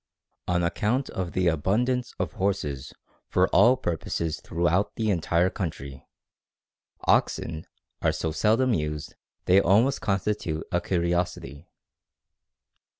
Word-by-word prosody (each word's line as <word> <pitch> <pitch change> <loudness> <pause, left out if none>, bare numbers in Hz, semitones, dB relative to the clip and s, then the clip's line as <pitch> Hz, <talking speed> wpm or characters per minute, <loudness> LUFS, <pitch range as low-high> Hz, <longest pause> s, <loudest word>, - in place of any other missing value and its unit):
_ - - -1
On 85 - +2
account 110 +9 0
of 90 -2 -4
the 90 -1 +1
abundance 115 - 0
of 85 -5 -2
horses 75 -9 -2 0.4
for - - +2
all 125 +2 +5
purposes 80 - -3
throughout 85 +4 0
the 110 -2 0
entire 85 0 +1
country, 70 -9 -6 1.0
oxen 80 -1 +1 0.3
are - - +3
so 80 - -2
seldom 115 +9 +2
used 75 -4 -3 0.3
they 95 +2 +5
almost 115 +10 +3
constitute 95 -5 -1
a 90 - +1
curiosity. 85 -4 -2
90 Hz, 115 wpm, -26 LUFS, 80-105 Hz, 1.0 s, all